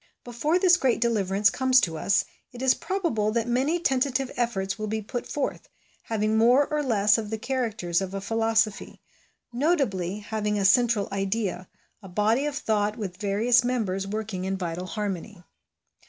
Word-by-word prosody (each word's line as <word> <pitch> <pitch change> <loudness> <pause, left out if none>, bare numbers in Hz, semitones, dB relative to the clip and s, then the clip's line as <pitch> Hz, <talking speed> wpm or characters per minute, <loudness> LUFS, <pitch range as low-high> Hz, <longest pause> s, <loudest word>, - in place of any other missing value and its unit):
Before 250 +8 0
this 360 -1 +5
great 265 -7 +1
deliverance 205 -3 +2
comes 260 -1 +4
to 165 -6 -1
us 195 +5 +1 0.3
it 245 +1 -8
is 265 -1 +5
probable 325 - -1
that 230 0 0
many 270 +8 +1
tentative 270 -3 0
efforts 200 -5 -2
will 215 - -3
be 220 +1 -2
put 240 +4 -5
forth, 290 - -4 0.4
having 215 -1 0
more 250 +5 +5
or 300 0 -1
less 215 -5 +3
of 215 -2 -5
the 220 - -3
characters 220 -8 -1
of 190 0 -5
a - - -2
philosophy; 225 0 0 0.5
notably, 235 - 0
having 210 0 -2
a 200 - 0
central 225 0 +3
idea, 195 -2 -2 0.3
a 195 - -11
body 220 +9 +1
of 295 - -4
thought 210 -3 0
with 190 -5 -5
various 220 +5 +2
members 205 -6 -1
working 205 -2 -4
in 190 +1 -2
vital 180 0 -4
harmony. 200 -2 -5
220 Hz, 165 wpm, -26 LUFS, 195-245 Hz, 0.5 s, this